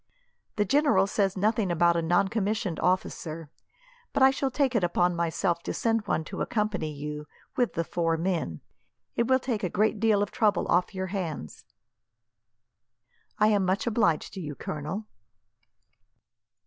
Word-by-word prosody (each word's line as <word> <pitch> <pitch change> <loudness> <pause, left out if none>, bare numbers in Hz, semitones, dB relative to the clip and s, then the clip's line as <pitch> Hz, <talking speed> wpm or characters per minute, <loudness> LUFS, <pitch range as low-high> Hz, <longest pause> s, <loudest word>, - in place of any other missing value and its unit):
The 210 - +1
general 275 -6 +3
says 195 -1 0
nothing 215 0 +1
about 170 0 +3
a 170 - +1
noncommissioned 195 +3 0
officer, 165 -3 -2 0.6
but 265 - +3
I 265 - +8
shall 270 0 -1
take 270 0 +1
it 225 -6 +1
upon 175 0 +2
myself 170 +1 0
to - - -4
send 225 -2 0
one 160 - 0
to - - -6
accompany 210 -8 -1
you, 150 +1 -6 0.3
with 245 -2 0
the 165 - 0
four 165 -1 0
men. 165 - -2 0.5
It 235 - +1
will 260 0 +5
take 245 -5 -3
a 180 - 0
good 215 +4 +1
deal 215 -2 +3
of 205 - -5
trouble 215 -3 +1
off 180 +3 +2
your 190 0 -2
hands." 160 - -5 1.7
"I 215 0 +4
am 205 -2 +3
much 185 +2 0
obliged 210 -9 +1
to 190 - -6
you, 150 -3 -5
Colonel." 155 +12 -5
190 Hz, 155 wpm, -27 LUFS, 170-220 Hz, 1.7 s, I